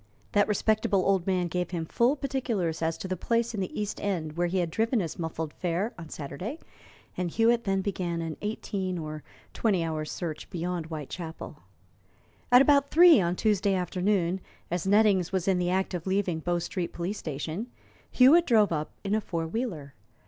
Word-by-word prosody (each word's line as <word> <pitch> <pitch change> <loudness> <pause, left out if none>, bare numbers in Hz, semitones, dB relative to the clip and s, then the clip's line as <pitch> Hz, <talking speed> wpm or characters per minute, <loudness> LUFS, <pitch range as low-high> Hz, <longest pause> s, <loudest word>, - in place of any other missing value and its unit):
That 205 0 +3
respectable 210 -2 +1
old 195 -2 +2
man 185 -2 +1
gave 180 +1 -2
him 170 -3 -3
full 240 - +2
particulars 245 - -2
as 160 0 0
to - - -6
the 185 - -2
place 230 +6 0
in 215 - -3
the 185 +1 -3
East 210 0 -3
End 165 -7 -2
where 175 +1 +1
he 185 +2 -1
had 175 -3 0
driven 225 +4 +1
his 170 -4 -4
muffled 160 -2 -4
fare 180 +5 -2
on 165 -2 -10
Saturday, 180 - -6 0.6
and 180 -1 -2
Hewitt 235 +5 +2
then 195 -1 +1
begun 180 -4 -2
an 165 -2 -4
eighteen, 195 -3 -3
or 155 -2 -5 0.3
twenty 195 -7 +1
hours' 155 -2 -3
search 165 -4 -5
beyond 175 -1 -3
Whitechapel. 160 0 -7 0.9
At 250 +2 +8
about 280 0 +4
three 340 - +7
on 175 0 0
Tuesday 200 -1 +2
afternoon, 185 0 0 0.3
as 175 +1 -1
Nettings 200 -4 +4
was 190 -1 -1
in 190 -2 +3
the 175 0 0
act 190 +1 0
of 175 0 -4
leaving 190 -4 0
Bow 175 +2 0
Street 175 +1 -3
Police 180 +5 -3
Station, 155 - -4 0.4
Hewitt 305 +7 +6
drove 215 -6 +4
up 155 -2 -2
in 200 0 -1
a 215 - +2
four 165 -5 -3
wheeler. 160 - -4
185 Hz, 185 wpm, -28 LUFS, 165-210 Hz, 0.9 s, At